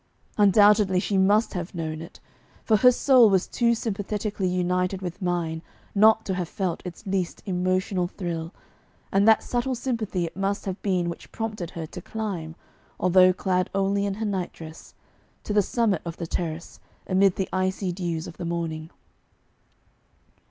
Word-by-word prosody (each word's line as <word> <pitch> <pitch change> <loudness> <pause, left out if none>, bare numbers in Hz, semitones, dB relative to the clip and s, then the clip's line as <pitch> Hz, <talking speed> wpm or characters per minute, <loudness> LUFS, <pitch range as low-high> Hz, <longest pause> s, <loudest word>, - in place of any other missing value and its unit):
Undoubtedly 205 -2 +5
she 200 - -1
must 205 +4 +3
have 180 +1 -5
known 160 -1 -4
it, 165 - -11 0.5
for 220 - +4
her 250 +4 +7
soul 250 -2 +5
was 190 -2 +2
too 235 -1 +1
sympathetically 210 -2 -2
united 180 +1 0
with 180 +1 -6
mine 170 -3 -1 0.3
not 220 +2 +5
to 190 - -1
have 180 -2 -3
felt 185 -4 -2
its 180 +5 -9
least 190 -3 -2
emotional 185 0 0
thrill, 170 -3 -5 0.6
and 200 +2 +3
that 220 -1 +6
subtle 250 +1 -1
sympathy 225 -8 -2
it 165 - -8
must 195 +2 -2
have 190 0 -4
been 185 -4 0
which 170 - -7
prompted 215 -6 -4
her 165 -2 -6
to 180 - -9
climb 180 -7 -5 0.4
although 185 0 +5
clad 185 -1 0
only 195 +1 +1
in 195 - -2
her 220 +2 -3
nightdress 175 -5 -5 0.5
to 210 - -3
the 205 - +5
summit 210 -3 0
of 170 -1 -6
the 170 - -4
terrace, 165 0 -4 0.3
amid 190 0 +3
the 190 - -2
icy 185 0 0
dews 170 -3 -3
of - - -10
the - - -6
morning. 165 -2 -3
185 Hz, 160 wpm, -25 LUFS, 175-205 Hz, 0.6 s, her